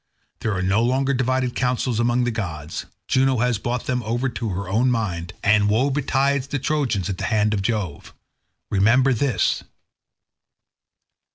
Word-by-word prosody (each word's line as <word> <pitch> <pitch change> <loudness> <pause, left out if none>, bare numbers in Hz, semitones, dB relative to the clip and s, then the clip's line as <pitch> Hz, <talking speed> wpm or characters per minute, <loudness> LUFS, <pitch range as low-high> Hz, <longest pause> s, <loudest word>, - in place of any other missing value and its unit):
There 110 -3 -1
are 95 - -1
no 95 +4 +2
longer 130 +3 +1
divided 130 -1 0
counsels 125 -2 0
among 120 +1 +2
the 120 - 0
gods; 80 -9 -5 0.2
Juno 130 0 +2
has 120 -2 +1
brought 120 +2 -3
them 125 -1 -1
over 120 +4 -1
to 115 -2 -4
her 95 0 -4
own 115 +7 +2
mind, 95 -8 -2
and 105 0 +4
woe 125 +7 +2
betides 140 0 +1
the 145 - -2
Trojans 135 - 0
at 95 -2 -4
the - - -2
hands 105 -1 +1
of 100 - 0
Jove. 100 -7 -3 0.6
Remember 120 +7 +4
this. 130 +2 0
120 Hz, 160 wpm, -22 LUFS, 105-130 Hz, 0.6 s, and